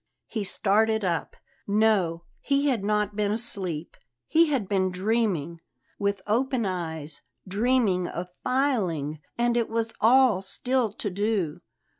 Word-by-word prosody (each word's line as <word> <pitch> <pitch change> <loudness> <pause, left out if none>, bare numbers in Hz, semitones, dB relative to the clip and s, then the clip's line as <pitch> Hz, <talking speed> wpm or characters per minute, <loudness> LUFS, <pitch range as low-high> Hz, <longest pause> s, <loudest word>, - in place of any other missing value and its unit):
He 220 -3 -3
started 220 +2 +1
up. 170 -2 -2 0.3
No, 200 -5 +2 0.2
he 280 0 +1
had 235 -7 0
not 210 0 0
been 205 -1 0
asleep; 190 -8 -1 0.3
he 330 +1 +4
had 265 -10 0
been 190 -2 +1
dreaming 185 -5 -1 0.4
with 200 -1 -1
open 245 +2 +1
eyes 160 -5 -4 0.3
dreaming 205 -3 +1
of 180 +1 -5
filing, 185 - 0 0.2
and 240 0 +2
it 235 -2 +1
was 225 0 -1
all 240 -3 +5
still 245 +3 -1
to 205 -2 -4
do. 200 -5 -1
210 Hz, 130 wpm, -26 LUFS, 185-235 Hz, 0.4 s, all